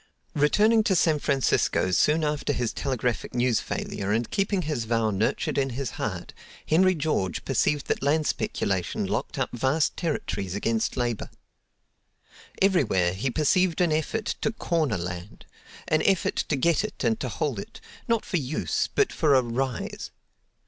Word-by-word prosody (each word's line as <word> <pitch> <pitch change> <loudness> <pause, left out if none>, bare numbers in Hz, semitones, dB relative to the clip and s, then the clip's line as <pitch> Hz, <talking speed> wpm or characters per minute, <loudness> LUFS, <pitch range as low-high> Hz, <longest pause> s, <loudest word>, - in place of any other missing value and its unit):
Returning 210 +10 +4
to 190 - +3
San 160 -3 +3
Francisco 135 -9 +1
soon 150 - +3
after 150 -1 0
his 120 -3 -1
telegraphic 125 -4 -2
news 120 -2 +2
failure, 100 +1 -3
and 115 +2 0
keeping 195 -1 0
his 145 -7 -2
vow 115 -1 +1
nurtured 105 +7 0
in 135 -1 +1
his 135 -5 -3
heart, - - -4 0.3
Henry 185 +4 +4
George 145 - -1
perceived 145 -1 +1
that - - -1
land 150 +3 +2
speculation 95 -9 -1
locked - - -3
up - - -1
vast 135 +6 +1
territories 100 - -3
against 110 +4 -1
labor. 120 -3 -2 1.3
Everywhere 115 - +3
he 110 +8 -2
perceived 160 +5 +2
an 175 -3 +3
effort 160 +8 -1 0.2
to 220 - +1
"corner" 160 - 0
land; 90 +2 -7 0.4
an 155 0 +2
effort 190 -1 +1
to 150 - +2
get 170 +7 +2
it 215 - -5
and 225 0 +1
to - - -3
hold - - -2
it, - - -9 0.3
not 230 -2 +1
for 180 - -1
use, 145 0 -1
but 415 - +2
for 150 -4 +3
a 130 - +4
"rise." 125 +1 -3
140 Hz, 155 wpm, -26 LUFS, 115-165 Hz, 1.3 s, Returning